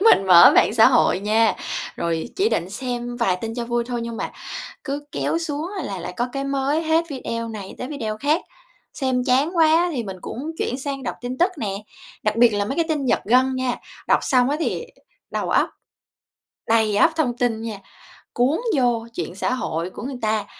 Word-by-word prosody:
mình 380 - +5
mở 175 -2 +9
mạng - - +4
xã 225 -1 +7
hội - - +3
nha, 220 +2 +3 0.4
rồi 170 +4 -2
chỉ 400 +3 +3
định 175 +2 -1
xem 245 +1 -4
vài 195 -7 +1
tin 225 +4 -5
cho 240 -1 -3
vui 240 0 -1
thôi 240 -1 -3
nhưng 230 0 -5
mà - - -3 0.5
cứ 290 0 -4
kéo 330 - -1
xuống 320 +1 -3
là 195 -7 -4
lại - - -6
có 240 - 0
cái 275 0 -2
mới 275 +3 0
hết, 320 +1 +2
video 230 -4 -4
này 205 -4 -7
tới 250 - -5
video 220 -8 -4
khác. 295 +7 +1 0.5
Xem 260 -3 0
chán 275 +7 +2
quá 325 +2 +5
thì 250 -7 -2
mình 190 -2 -6
cũng 295 +6 -5
chuyển 250 - -2
sang 275 -1 -4
đọc - - -3
tin 245 +1 -4
tức 365 +2 +3
nè, 215 -7 -2 0.5
đặc 210 0 +1
biệt 235 +1 +6
là 205 0 0
mấy 270 - -3
cái 335 - +1
tin 300 -4 -1
giật - - +2
gân 255 +4 +3
nha, 255 -1 0 0.3
đọc - - +4
xong 255 -2 +3
á 295 - 0
thì - - -2 0.5
đầu - - -2
óc - - +3 1.0
đầy 220 -2 +3
ắp 320 +10 +5
thông 255 -7 0
tin 235 -3 0
nha, 220 -3 -5 0.6
cuốn 260 - +2 0.2
vô 240 -3 +1
chuyện 175 -3 -4
xã 245 - -1
hội 165 -8 -2
của - - -9
người 265 0 -5
ta. 215 -2 0
245 Hz, 205 wpm, -22 LUFS, 220-280 Hz, 1.0 s, mở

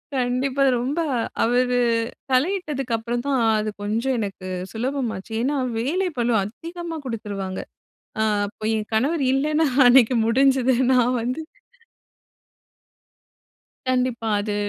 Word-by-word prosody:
கண்டிப்பா 255 +2 0 0.2
ரொம்ப 275 +7 -2 0.4
அவர் 250 +2 +2 0.6
தலையிட்டதுக்கு 280 -4 0
அப்புறம் 240 +2 -3
தான் 275 -2 +1 0.2
அது 215 - -2
கொஞ்சம் 230 +6 0
எனக்கு 195 -3 -5 0.2
சுலபம் 250 +2 -2
ஆச்சு. 190 +4 -10
ஏன்னா 275 +4 0 0.2
வேலை 345 +11 0
பழு 240 0 +1
அதிகமா 335 - -7
குடுத்துருவாங்க. 205 -5 -4 0.6
ஆ - - +3 0.2
அப்ப 210 +1 -14
என் 215 -1 -4
கணவர் 280 +8 +1
இல்லனா 300 +4 +2 0.2
அன்னைக்கு 245 0 +6
முடிஞ்சுது. 260 +1 +3 0.2
நான் 250 0 +3
வந்து 255 +7 -2 2.5
கண்டிப்பா. 250 -3 0
அது 210 0 -3
250 Hz, 110 wpm, -23 LUFS, 225-275 Hz, 2.5 s, அன்னைக்கு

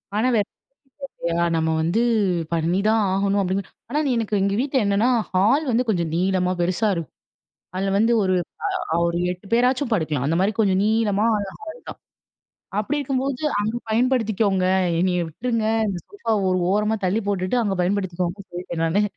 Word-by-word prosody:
ஆனா 220 +4 +2
வேற 205 -3 +2 0.6
வழி - - -3
இல்லையா, 170 0 0
நம்ம 160 0 +1
வந்து 175 +8 +1 0.5
பண்ணிதான் 195 +7 +2
ஆகணும் 200 +1 +1
அப்படின்னு. 190 +1 -1 0.3
ஆனா 295 - 0
நீ 275 - +1
எனக்கு 215 -3 0
எங்க 200 +1 +1
வீட்டுல 265 -2 +1
என்னன்னா, 200 +5 +2 0.2
ஹால் 225 +12 +3
வந்து 240 +2 +2
கொஞ்சம் 170 -6 0
நீளமா 185 0 +1
பெருசா 185 +5 +1
இருக்கும். 165 -2 -6 0.6
அதில 195 +1 0
வந்து 225 +2 +3
ஒரு 185 -1 +1 0.6
அ - - +3
ஒரு 170 0 -1
8 180 +2 -7
பேராச்சும் 250 +2 +2
படுக்கலாம். 155 - 0
அந்த 165 - +1
மாரி 200 +3 +2
கொஞ்சம் 195 -3 +2
நீளமான 215 -1 +2 0.2
ஹால் 320 +9 -8
தான். - - -8 0.8
அப்படி 295 +8 -1
இருக்கும்போது, 270 -1 -2 0.2
"அங்க 215 +3 -1
பயன்படுத்திக்கோங்க. 220 -5 +1 0.3
என்னைய 180 0 +1
விட்டுருங்க 230 +7 -2 0.2
இந்த 195 - -2
சோஃபாவ 230 - -1
ஒரு 185 0 +1
ஓரமா 210 +2 +1
தள்ளி 190 +4 +1
போட்டுட்டு 190 +1 0
அங்க 205 -4 0
பயன்படுத்திக்கோங்கன்னு." 185 0 -2
சொல்லிட்டேன் 175 -1 -5
நானு. 165 +6 +2
200 Hz, 160 wpm, -22 LUFS, 180-225 Hz, 0.8 s, ஹால்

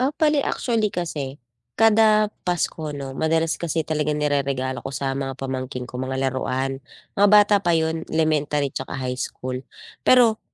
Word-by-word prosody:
Ah, 270 +3 +1
bale 300 -2 +3
actually 225 -3 0
kasi, 145 -6 -4 0.4
kada 215 -1 +5 0.2
Pasko 160 -3 -2
'no 135 -2 -6
madalas 160 +1 +1
kasi 165 -1 -2
talaga 150 -1 -1
nireregalo 140 -3 -1
ko 135 - -5
sa 135 -1 -2
mga 135 -1 -3
pamangkin 130 -1 -4
ko, 125 - -7
mga 130 0 -3
laruan. 130 +1 -2 0.4
Mga 205 +1 +5
bata 210 0 +7
pa 175 - +3
yun, 160 0 -1
elementary 150 -2 +1
tsaka 135 +1 -5
high 125 -1 -3
school. 130 0 -4 0.4
Pero, 235 -4 +5
150 Hz, 155 wpm, -23 LUFS, 135-180 Hz, 0.4 s, bata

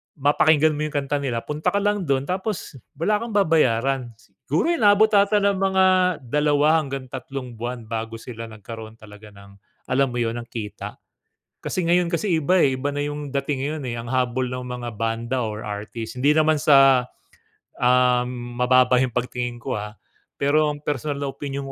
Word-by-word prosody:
mapakinggan 150 +2 +3
mo 150 0 -2
yung 150 - -10
kanta 145 +1 -1
nila, 125 -5 -2
punta 150 +1 -4
ka 200 - -1
lang 205 -4 0
dun 135 -1 +1
tapos 185 -3 -4 0.2
wala 205 +8 +1
kang 230 -2 -6
babayaran. 135 - +2 0.3
Siguro, 165 - +1
inaabot 215 -7 +4
'ata 205 0 +4
ng 200 -1 +2
mga 190 -1 +3 0.4
2 150 +4 +3
hanggang 135 -3 -5
tatlong 130 -1 -6
buwan 120 0 -4
bago 115 0 -4
sila 115 0 -8
nagkaroon 110 0 -10
talaga 105 -1 -14
ng 100 0 -16 0.3
alam 135 0 +1
mo 120 - -3
yun, 115 -1 -1
ng 120 - -5
kita. 105 -3 -7 0.6
Kasi 185 - -3
ngayon 175 0 +3
kasi 170 0 +1
iba 180 +4 +3
eh, 135 -2 +2
iba 140 +2 -2
na 145 - -1
yung 145 -1 -5
dating 140 -1 -1
ngayon 155 0 -4
eh, 120 -1 -4
ang 115 - -6
habol 130 0 0
ng 125 0 -5
mga 125 -1 -6
banda 115 +3 -2
or 110 -1 -4
artist 110 +2 -6
hindi 140 +3 +4
naman 155 0 +4
sa, 135 -3 +6 0.7
um, 125 -1 +1
mababa 125 +1 +4
yung 130 -1 0
pagtingin 120 0 -3
ko - - -3
ah. 105 0 -6 0.4
Pero 150 +2 +2
ang 145 - -7
personal 145 0 -3
na 140 - -2
opinyon 140 0 -5
135 Hz, 175 wpm, -23 LUFS, 120-150 Hz, 0.7 s, sa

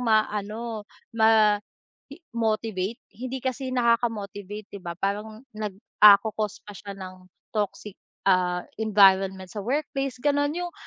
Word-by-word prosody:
ma-ano, 215 -1 -1 0.2
ma 220 -2 +4 0.5
i 280 - -10 0.2
motivate, 220 -2 -1 0.2
hindi 255 +3 -6
kasi 260 0 -2
nakaka-motivate 215 -4 -1
'di 200 - -7
ba? 170 -1 -6
Parang 210 +5 -3
nag, 210 -3 -5 0.2
ah, 210 -1 +11
ko-cause 215 0 -4
pa 205 - -10
siya 200 0 -9
ng 185 -1 -10 0.2
toxic, 210 -1 -3 0.3
ah, 180 -2 +2 0.2
environment 195 -3 +4
sa 210 - -4
workplace 275 +2 -2
gano'n, 290 +3 +1
'yong 355 0 -3
215 Hz, 125 wpm, -26 LUFS, 200-235 Hz, 0.5 s, ah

